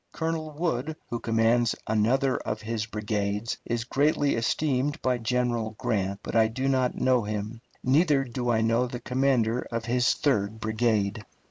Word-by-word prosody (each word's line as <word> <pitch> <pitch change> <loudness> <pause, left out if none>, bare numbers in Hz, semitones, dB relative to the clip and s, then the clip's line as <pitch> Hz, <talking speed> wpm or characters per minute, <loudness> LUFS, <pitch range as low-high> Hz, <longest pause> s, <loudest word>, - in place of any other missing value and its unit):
Colonel 160 -1 -2
Wood, 155 -2 -2 0.2
who 120 - -2
commands 115 +1 +2
another 120 +5 +2
of 110 - -4
his 110 -1 -2
brigades, 105 0 -2
is 120 -1 -1
greatly 145 +3 +2
esteemed 135 +4 0
by 125 -1 +1
General 120 -2 -1
Grant, 100 -2 -1
but - - -5
I 110 -1 +5
do 130 +4 -2
not 130 -2 +1
know 130 -1 +2
him; 105 +2 -4 0.2
neither 145 +1 +3
do 120 -1 -3
I 115 -2 +2
know 115 +2 +2
the 120 0 -6
commander 125 -2 +1
of 115 -1 -3
his 125 +1 +2
third 110 -6 0
brigade. 110 -1 0
120 Hz, 155 wpm, -27 LUFS, 110-130 Hz, 0.2 s, I